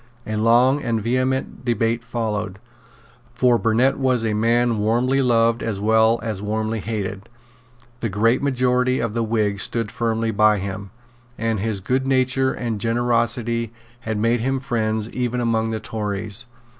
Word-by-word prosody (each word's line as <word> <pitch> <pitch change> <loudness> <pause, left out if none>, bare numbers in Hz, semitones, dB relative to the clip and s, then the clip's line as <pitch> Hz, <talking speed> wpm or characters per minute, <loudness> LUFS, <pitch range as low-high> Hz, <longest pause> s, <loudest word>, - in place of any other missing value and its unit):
A 110 - -3
long 120 +6 +4
and 115 -3 -1
vehement 130 +3 -1
debate 115 -1 0
followed. 110 -4 -3 0.8
For 125 -1 +3
Burnet 120 +5 +2
was 130 -4 +1
a 110 - 0
man 115 +1 +2
warmly 120 +6 +2
loved 115 -2 +2
as 105 -3 -3
well 110 +2 +3
as 110 -4 -4
warmly 110 +1 -2
hated. 105 -1 -4 0.7
The 115 - -2
great 115 +5 +2
majority 130 -1 +1
of 115 -2 -2
the 115 - -1
Whigs 105 -3 0
stood 115 +1 -1
firmly 115 -1 -1
by 105 0 +4
him; 100 0 -5 0.5
and 115 -1 -1
his 105 -1 -2
goodnature 130 +2 +1
and 115 -4 -4
generosity 115 0 0 0.3
had 110 -2 -3
made 115 +2 +1
him 135 +2 0
friends 110 -4 -1
even 125 -1 -2
among 115 -2 0
the 110 -1 -2
Tories. 105 0 -3
115 Hz, 145 wpm, -22 LUFS, 110-120 Hz, 0.8 s, long